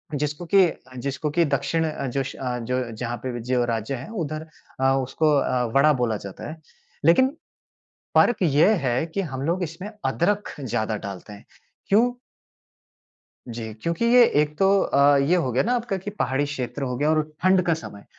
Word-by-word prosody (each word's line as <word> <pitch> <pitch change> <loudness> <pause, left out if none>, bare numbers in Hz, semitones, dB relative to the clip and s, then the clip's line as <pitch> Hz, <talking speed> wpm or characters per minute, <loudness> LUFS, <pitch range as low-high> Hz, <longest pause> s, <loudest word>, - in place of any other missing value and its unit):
जिसको 150 +4 -3
की 195 +2 +5
अ, 130 - -10
जिसको 140 +3 -3
की 170 - +5
दक्षिण 155 +3 0
अ, 140 -3 -4
जश 135 +1 -3
अ, 125 -2 -3
जो 125 0 -2
जहाँ 120 +2 -4
पे 130 - -2
भी 120 - -5
जो 125 -1 +3
राज्य 115 +2 -2
है 130 - -8
उधर 155 +1 -5 0.3
अ, 135 0 +4
उसको 155 +4 +1
अ, 130 -2 +1
वड़ा 150 +2 +5
बोला 110 -3 0
जाता 100 +7 -7
है। 160 - -8 0.5
लेकिन 260 +12 +5 0.9
फ़र्क 240 - +4
ये 160 +6 +4
है 125 +4 +1
कि 200 - 0
हम 135 -8 -5
लोग 175 +3 0
इसमें 170 +5 -6 0.2
अदरक 205 +4 0
ज़्यादा 110 -4 -2
डालते 100 +1 -8
हैं। 100 - -14 0.4
क्यों 230 +5 +4 1.4
जी। 115 -2 -6
क्योंकि 170 +7 -1
ये 240 +1 +7 0.2
एक 150 0 -5
तो 195 - +4
अ, 140 -3 +4
ये 145 +6 +3
हो 160 -8 0
गया 125 - +2
ना 240 - 0
आपका 235 -5 -1
कि 190 +2 -6
पहाड़ी 135 -6 -1
क्षेत्र 145 -1 -5
हो 125 -2 -2
गया 145 +4 +1
और 155 0 +3 0.2
ठंड 185 0 +4
का 170 - +3
समय। 105 -10 -10
145 Hz, 190 wpm, -24 LUFS, 125-170 Hz, 1.4 s, ये